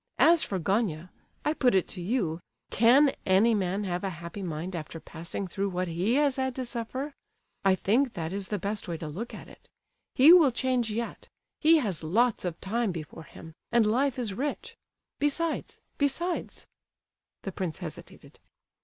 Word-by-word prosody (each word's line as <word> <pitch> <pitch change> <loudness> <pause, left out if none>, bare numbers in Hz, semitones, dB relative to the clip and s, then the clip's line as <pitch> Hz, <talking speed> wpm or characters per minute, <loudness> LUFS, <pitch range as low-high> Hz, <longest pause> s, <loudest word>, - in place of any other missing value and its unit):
As 335 0 +6
for 195 - -2
Gania, 185 -2 -1 0.3
I 300 - +2
put 250 -8 +2
it 190 - +2
to 180 - -6
you, 175 -5 -1 0.3
can 260 +6 +5
any 200 +5 +4
man 195 0 0
have 180 -1 -3
a 195 - -1
happy 170 +2 -7
mind 175 +1 -4
after 165 0 -6
passing 170 +5 -6
through 195 +2 -2
what 180 0 -2
he 180 +8 0
has 285 -2 +2
had 260 -1 -1
to 260 - -3
suffer? 255 +4 -4 0.5
I 195 -1 +4
think 235 +7 +1
that 165 +1 -4
is 195 -1 -4
the 210 - -2
best 200 +2 -4
way 170 -2 -3
to 160 - -6
look 200 +11 -6
at - - -10
it. - - -17 0.5
He 290 +6 +9
will 335 -6 +7
change 245 -1 0
yet, 230 +2 -4 0.3
he 325 +1 +6
has 205 - -2
lots 215 +8 +1
of 170 -2 -3
time 225 +1 0
before 165 -1 -8
him, 160 +3 -12 0.2
and 235 -2 +4
life 260 +5 +1
is 230 -6 -2
rich; 280 +8 -4 0.4
besides—besides..." 310 +1 -2 0.8
the 195 - -4
prince 180 -5 -4
hesitated. - - -10
210 Hz, 170 wpm, -28 LUFS, 180-255 Hz, 0.8 s, He